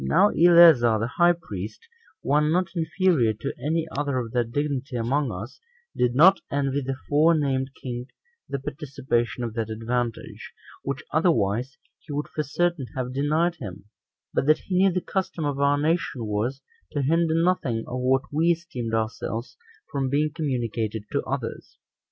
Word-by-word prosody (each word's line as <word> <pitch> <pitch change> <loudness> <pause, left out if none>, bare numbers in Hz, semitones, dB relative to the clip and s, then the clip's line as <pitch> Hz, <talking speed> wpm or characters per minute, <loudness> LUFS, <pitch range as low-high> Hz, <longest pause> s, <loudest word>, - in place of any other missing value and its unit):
Now 70 - +4
Eleazar 165 - +6
the 115 +3 -2
high 175 0 +6
priest, 105 - -8 0.4
one 150 +2 +2
not 180 +2 +1
inferior 160 - +2
to 120 +6 -5
any 160 +2 0
other 140 -1 -1
of 120 -3 -3
that 120 -1 -1
dignity 140 -1 -2
among 125 +3 0
us, 105 +7 -7 0.4
did 125 0 +1
not 185 +7 +6
envy 140 0 0
the 135 0 -3
forenamed 145 -3 +2
king 125 -1 -6 0.4
the 140 - -2
participation 130 -3 -2
of 115 -2 -3
that 115 -1 -3
advantage, 115 +1 -4 0.3
which 140 -1 -4
otherwise 130 - +1 0.2
he 155 - -12
would 145 +1 -2
for 155 - -2
certain 160 -1 -1
have 125 -1 -3
denied 155 +5 +1
him, 100 - -8 0.5
but 135 - 0
that 155 +1 +6
he 185 - -5
knew 190 +1 +4
the 180 +1 -1
custom 180 -5 -3
of 140 -1 -2
our 140 0 +3
nation 145 -5 0
was, 115 +6 -2 0.3
to 145 - 0
hinder 165 +3 +2
nothing 160 -10 +1
of 125 - -4
what 130 +1 +2
we 155 +3 +1
esteemed 130 -10 -2
ourselves 115 +1 -3 0.4
from 135 -3 -1
being 150 +3 +1
communicated 115 -7 -2
to - - 0
others. - - -5
140 Hz, 160 wpm, -25 LUFS, 120-160 Hz, 0.5 s, Eleazar